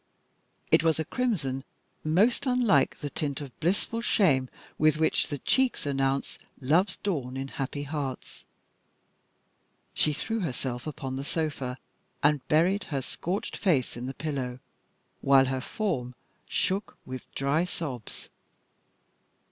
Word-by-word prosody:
It - - +6
was 165 -1 +3
a 160 - 0
crimson 150 - -1 0.4
most 200 - +3
unlike 240 - +3
the 145 - -2
tint 140 -3 -2
of 140 -4 -9
blissful 200 +6 0
shame 150 - +3 0.3
with 155 0 +5
which 160 0 +2
the 145 - -3
cheeks 260 - +2
announce 135 -1 0 0.2
love's 160 +9 +2
dawn 135 -10 -2
in 135 0 -3
happy 145 +2 -3
hearts. 140 -3 -5 1.5
She 155 - +3
threw 225 +10 -2
herself 130 - -3
upon 135 -3 -4
the 135 - -3
sofa, 145 -5 -2 0.5
and 145 -1 +4
buried 175 +6 +3
her 140 -4 -2
scorched 180 +9 -3
face 155 -11 +1
in 120 +1 -5
the 135 - -5
pillow 135 -5 -3 0.6
while 135 -1 +6
her 130 0 -1
form 130 - -2 0.3
shook 195 +3 -1
with 130 0 -7
dry 140 +4 +2
sobs. 140 - -6
145 Hz, 130 wpm, -28 LUFS, 135-175 Hz, 1.5 s, It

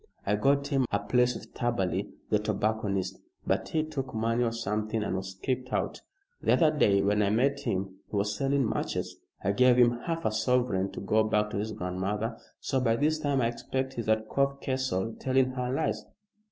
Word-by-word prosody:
I 105 - +2
got 140 +6 +2
him 135 -4 +2
a 100 - +3
place 125 +5 +2
with - - -10
Taberley, 95 -8 -1 0.2
the - - +4
tobacconist, 100 -3 -1 0.3
but - - 0
he 155 -1 +1
took 135 -6 -5
money 115 +2 +1
or 115 - +1
something 110 -1 -2
and 95 - -2
was 95 0 -5
kicked 130 -1 -2
out. - - -1 0.4
The - - +3
other 155 -2 +4
day 100 -9 +4
when 105 +1 +2
I 100 - +3
met 135 +6 +2
him 95 -6 -3
he - - -5
was 100 0 0
selling 135 0 +1
matches. - - -2 0.3
I 100 - +2
gave 125 +3 +5
him 120 -1 +4
half 165 -1 -2
a 110 - +2
sovereign 110 -4 +1
to - - -6
go 110 +2 +3
back 105 -1 +1
to - - -3
his 110 +2 -2
grandmother, 100 +4 -2 0.2
so 135 - 0
by 115 -3 +2
this 155 +5 +1
time 145 -3 +1
I 115 - +2
expect 130 +2 -3
he's 115 -3 -4
at 110 0 +2
Cove 140 +2 0
Castle 130 -7 -1
telling 130 0 +2
her 125 -1 -2
lies. 145 +4 -1
115 Hz, 200 wpm, -29 LUFS, 105-130 Hz, 0.4 s, gave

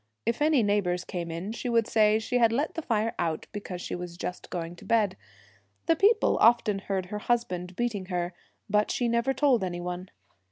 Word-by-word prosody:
If 235 +4 -1
any 300 -5 +4
neighbours 195 -4 +1
came 175 -3 -4
in 170 +5 -4
she 235 +2 -4
would 230 -1 +3
say 215 -1 +4
she 245 +3 -1
had 230 -2 +5
let 285 +7 0
the 325 - -3
fire 225 -4 0
out 165 -2 -1
because 195 -4 -6
she - - -5
was 175 -1 -6
just 180 +1 -5
going 170 -1 -4
to - - -13
bed. 210 -5 +2 0.7
The 330 - +4
people 430 +6 +4
about - - +8
often 230 -4 +3
heard 195 -1 -2
her 210 +3 -5
husband 185 -7 -1
beating 215 -5 -2
her, 180 -1 -2 0.3
but 210 +1 +2
she 245 - 0
never 235 +3 +1
told 270 -6 +3
any 175 -1 -3
one. 180 +1 -5
210 Hz, 205 wpm, -28 LUFS, 180-235 Hz, 0.7 s, about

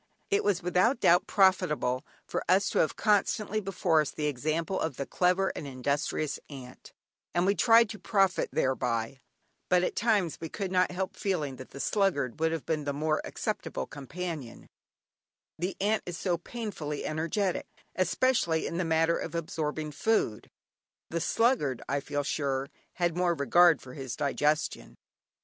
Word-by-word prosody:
It 405 - +3
was 200 -3 +1
without 185 +8 +2
doubt 175 -4 +4
profitable 150 -9 +2 0.2
for - - -3
us 195 +2 +4
to - - +1
have 155 - +2
constantly 215 0 +1
before 180 -5 +2
us 150 - -2
the 150 - -4
example 155 +6 -1
of 160 -5 -2
the 140 - -3
clever 180 +4 +2
and 145 - -5
industrious 140 +2 -2
ant, 130 -3 -11 0.4
and 175 +1 +3
we 200 - +4
tried 230 +1 +5
to 215 -2 -7
profit 195 -1 +2
thereby, 125 -1 -1 0.5
but 180 0 +4
at - - -1
times 205 -7 +1
we 165 - -4
could 195 0 -4
not 185 0 +3
help 185 +1 -3
feeling 155 -9 -2
that 130 - -10
the 140 - -10
sluggard 155 - 0
would 160 0 +2
have 165 -3 -3
been 155 -2 -1
the 140 - -1
more 155 +2 0
acceptable - - -3
companion; 150 -2 -6 0.9
the 180 +3 -2
ant 210 +2 +1
is 175 -2 -4
so 180 -1 0
painfully 170 -6 -5
energetic, 165 +5 -1 0.3
especially 185 -4 +1
in 170 - -3
the 180 - +1
matter 165 0 +2
of - - -5
absorbing 155 -2 -3
food 150 - 0 0.6
the 170 0 -1
sluggard, 225 - +2
I 140 - 0
feel 145 +1 -3
sure, 140 -2 -1 0.2
had 175 -2 0
more 175 -1 +2
regard 165 +3 +4
for 125 - -10
his 130 -3 -5
digestion. 150 +2 -1
165 Hz, 160 wpm, -29 LUFS, 145-190 Hz, 0.9 s, tried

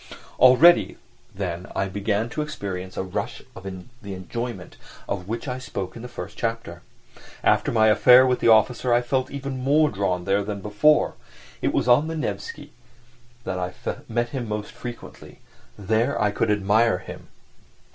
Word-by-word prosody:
Already 140 +8 +6 0.4
then 90 -1 -4
I 95 - 0
began 100 +3 -1
to 150 - -3
experience 95 -11 -6
a - - -1
rush 95 - -5
of - - -9
the 100 +3 -9
enjoyment 95 +1 -6 0.3
of 90 -2 -4
which 115 +5 -4
I 125 0 -3
spoke 95 -7 -6
in 115 - -8
the 125 - -7
first - - -8
chapter. 115 -7 -3 0.6
After - - +2
my 110 -2 +3
affair 125 +4 +7
with 125 -1 +1
the - - +1
officer 115 +3 +4
I 120 +1 +3
felt 130 +1 -1
even 140 -2 -5
more 150 +3 +3
drawn 95 -3 -1
there 100 +1 +1
than 100 0 -5
before: 105 +10 +3 0.5
it - - +1
was - - 0
on 125 +6 +5
the 165 0 -4
Nevsky 145 +4 -5 0.7
that 90 -4 -3
I 90 0 -4 0.3
met 120 +1 -1
him 125 -2 -4
most 105 0 -4
frequently, 120 -1 -10 0.4
there 110 +7 0
I 105 -1 +2
could 110 +2 -1
admire 105 +1 +3
him. 95 - -10
110 Hz, 165 wpm, -24 LUFS, 100-125 Hz, 0.7 s, affair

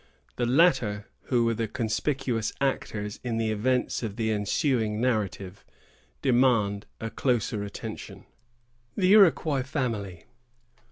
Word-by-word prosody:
The 120 - -1
latter, 125 - +3 0.2
who 120 -3 +2
were 115 - +2
the 115 0 -2
conspicuous 115 +1 -1
actors 110 -6 -2
in 120 -2 -2
the 110 -1 0
events 125 +4 0
of 110 -4 -4
the 110 -1 -1
ensuing 110 +1 0
narrative, 100 -6 -2 0.6
demand 120 -6 +2
a 115 0 -5
closer 115 -5 0
attention. 100 - -8 0.7
THE 190 -1 +4
IROQUOIS 160 -8 +5
FAMILY. 110 - -3
115 Hz, 115 wpm, -27 LUFS, 105-130 Hz, 0.7 s, IROQUOIS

